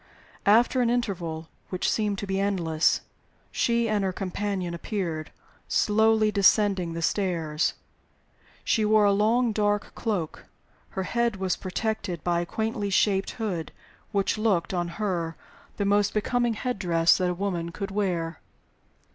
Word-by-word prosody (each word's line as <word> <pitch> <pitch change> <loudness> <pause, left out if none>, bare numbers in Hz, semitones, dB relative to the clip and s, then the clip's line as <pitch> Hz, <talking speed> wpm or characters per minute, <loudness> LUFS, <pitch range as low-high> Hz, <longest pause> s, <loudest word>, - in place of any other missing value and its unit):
After 240 +5 +5
an 240 - +2
interval 175 -9 -2 0.2
which 185 - -1
seemed 210 -2 0
to 200 - -4
be 195 0 -1
endless, 170 -6 +1 0.5
she 235 -1 +1
and 210 -2 +1
her 190 - 0
companion 190 -1 -3
appeared, 170 -3 -3 0.4
slowly 220 0 +3
descending 200 -3 +3
the 165 0 -4
stairs. 165 -5 0 0.9
She 220 - +2
wore 215 0 +4
a 200 - +5
long 225 +4 +3
dark 205 -1 0
cloak; 195 -9 -3 0.5
her 190 - 0
head 235 +2 0
was 190 -1 -1
protected 185 -3 -3
by 175 -1 +1
a 175 - -3
quaintly 220 0 -2
shaped 195 0 +2
hood, 190 -8 -3 0.4
which 200 +1 0
looked 200 -5 +1
(on 175 -1 0
her) 175 -6 -2 0.4
the 200 - 0
most 205 +1 +2
becoming 240 +2 +1
head 250 0 -3
dress 170 -3 +3
that 180 -1 +1
a 180 - -1
woman 175 -3 -2
could 195 +3 -5
wear. 175 -5 -1
200 Hz, 145 wpm, -26 LUFS, 175-215 Hz, 0.9 s, After